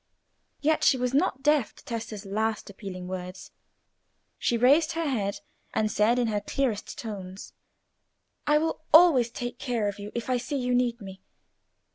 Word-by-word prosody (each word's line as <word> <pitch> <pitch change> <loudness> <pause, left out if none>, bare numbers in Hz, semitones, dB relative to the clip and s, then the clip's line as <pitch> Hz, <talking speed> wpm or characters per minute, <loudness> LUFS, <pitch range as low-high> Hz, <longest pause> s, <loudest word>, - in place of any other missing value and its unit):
Yet 310 +1 +2
she 265 - +5
was 250 0 -1
not 275 -2 +1
deaf 295 -5 +2
to - - -18
Tessa's 225 -5 -5
last 215 +1 -2
appealing 185 -3 -8
words; 185 0 -7 0.9
she 235 - +1
raised 290 +7 +4
her 330 -1 -1
head, 205 -7 -2 0.3
and 215 -1 +1
said, 225 +4 +3
in 245 - +2
her 210 -1 -1
clearest 245 -5 -2
tones— 195 -4 -7 0.9
"I 295 0 +5
will 320 +1 -1
always 310 -8 +7
take 240 +1 -6
care 240 -6 -1
of 205 0 -4
you 205 +1 -7
if 235 - -3
I 255 -1 +1
see 250 +4 -3
you 250 -1 -1
need 245 -1 +1
me. 190 -1 -10
235 Hz, 165 wpm, -27 LUFS, 205-270 Hz, 0.9 s, always